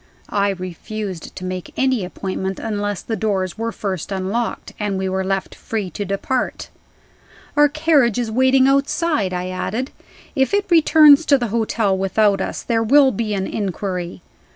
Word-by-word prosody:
I 200 Hz, 0 st, +2 dB
refused 185 Hz, 0 st, -6 dB
to 185 Hz, -, -6 dB
make 185 Hz, -1 st, -6 dB
any 260 Hz, -5 st, +1 dB
appointment 190 Hz, +1 st, -4 dB
unless 205 Hz, -3 st, -3 dB
the 225 Hz, -, -3 dB
doors 190 Hz, -3 st, -1 dB
were 230 Hz, +1 st, -3 dB
first 195 Hz, -4 st, -4 dB
unlocked, 195 Hz, +5 st, -3 dB
and 205 Hz, -2 st, -1 dB
we 190 Hz, 0 st, -2 dB
were 190 Hz, 0 st, -1 dB
left 195 Hz, 0 st, -2 dB
free 210 Hz, -5 st, -4 dB
to 205 Hz, -, -4 dB
depart. 200 Hz, +7 st, -2 dB, 0.9 s
"Our 295 Hz, 0 st, +5 dB
carriage 290 Hz, -7 st, +2 dB
is 235 Hz, -3 st, -1 dB
waiting 260 Hz, +2 st, +4 dB
outside," 275 Hz, -, +1 dB
I 180 Hz, 0 st, -3 dB
added. 215 Hz, +8 st, -3 dB, 0.4 s
"If 265 Hz, +8 st, +2 dB
it 405 Hz, 0 st, +1 dB
returns 310 Hz, -2 st, +7 dB
to 280 Hz, -, +5 dB
the 240 Hz, -3 st, -2 dB
hotel 220 Hz, -2 st, 0 dB
without 195 Hz, +2 st, +2 dB
us, -, -, -4 dB
there 230 Hz, -2 st, 0 dB
will 265 Hz, +4 st, +5 dB
be 215 Hz, -1 st, -2 dB
an 190 Hz, -1 st, -1 dB
inquiry." 185 Hz, -3 st, -4 dB
210 Hz, 160 wpm, -20 LUFS, 190-260 Hz, 0.9 s, returns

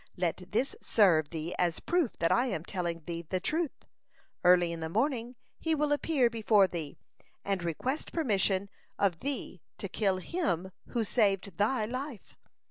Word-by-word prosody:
Let 180 Hz, 0 st, -1 dB
this 255 Hz, +6 st, 0 dB
serve 165 Hz, -9 st, +4 dB
thee 165 Hz, +1 st, -4 dB
as 175 Hz, -2 st, +1 dB
proof 345 Hz, -8 st, 0 dB
that 165 Hz, -, +2 dB
I 250 Hz, +2 st, +3 dB
am 165 Hz, -9 st, -3 dB
telling 170 Hz, -3 st, -3 dB
thee 170 Hz, -1 st, -4 dB
the 185 Hz, +3 st, -2 dB
truth: 310 Hz, -, -2 dB, 0.6 s
Early 175 Hz, -1 st, +5 dB
in 165 Hz, -, -5 dB
the 160 Hz, 0 st, -3 dB
morning 240 Hz, -, 0 dB, 0.2 s
he 325 Hz, -1 st, +1 dB
will 300 Hz, 0 st, +1 dB
appear 290 Hz, -3 st, +3 dB
before 220 Hz, -3 st, +4 dB
thee 165 Hz, -6 st, -5 dB, 0.5 s
and 195 Hz, -2 st, 0 dB
request 210 Hz, -, -2 dB
permission 200 Hz, -, +1 dB, 0.3 s
of 185 Hz, -5 st, +1 dB
thee 265 Hz, -, -4 dB, 0.2 s
to 200 Hz, -, -4 dB
kill 195 Hz, 0 st, +1 dB
him 190 Hz, -, -2 dB, 0.2 s
who 235 Hz, -2 st, -1 dB
saved 200 Hz, -3 st, +1 dB
thy 220 Hz, +2 st, +2 dB
life. 255 Hz, 0 st, -6 dB
200 Hz, 160 wpm, -30 LUFS, 175-255 Hz, 0.6 s, Early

